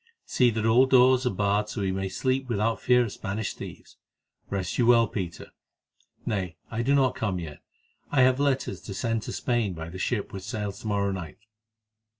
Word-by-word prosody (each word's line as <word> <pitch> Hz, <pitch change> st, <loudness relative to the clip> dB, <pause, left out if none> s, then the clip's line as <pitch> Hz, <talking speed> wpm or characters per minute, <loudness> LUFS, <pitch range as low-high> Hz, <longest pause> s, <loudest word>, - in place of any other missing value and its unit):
See 125 Hz, -2 st, +3 dB
that 110 Hz, -1 st, -2 dB
all 120 Hz, +4 st, +5 dB
doors 130 Hz, 0 st, +5 dB
are -, -, +3 dB
barred 100 Hz, +1 st, 0 dB
so 110 Hz, -, -5 dB
that 100 Hz, -, -1 dB
we 95 Hz, -, 0 dB
may 95 Hz, 0 st, -2 dB
sleep 130 Hz, +5 st, -1 dB
without 115 Hz, 0 st, 0 dB
fear 125 Hz, 0 st, +4 dB
of 115 Hz, -, -4 dB
Spanish 100 Hz, +2 st, -4 dB
thieves. -, -, -10 dB, 0.5 s
Rest 95 Hz, +1 st, -3 dB
you 120 Hz, -, +3 dB
well, 115 Hz, -1 st, +6 dB
Peter. 90 Hz, -5 st, -6 dB, 0.7 s
Nay, 95 Hz, -6 st, -2 dB, 0.2 s
I 115 Hz, -, -1 dB
do 135 Hz, +4 st, +2 dB
not 135 Hz, -2 st, +3 dB
come 100 Hz, -5 st, -2 dB
yet; 80 Hz, -4 st, -7 dB, 0.5 s
I 135 Hz, -, +4 dB
have 130 Hz, +1 st, +4 dB
letters 140 Hz, -2 st, 0 dB
to 100 Hz, -, -7 dB
send 115 Hz, +3 st, -1 dB
to -, -, -6 dB
Spain 115 Hz, -7 st, -1 dB
by 80 Hz, 0 st, -6 dB
the 95 Hz, +2 st, -8 dB
ship 105 Hz, +2 st, -2 dB
which 95 Hz, -, -5 dB
sails 105 Hz, -1 st, -4 dB
to -, -, -7 dB
morrow 100 Hz, -1 st, +1 dB
night." 90 Hz, -6 st, -6 dB
110 Hz, 200 wpm, -27 LUFS, 95-125 Hz, 0.7 s, well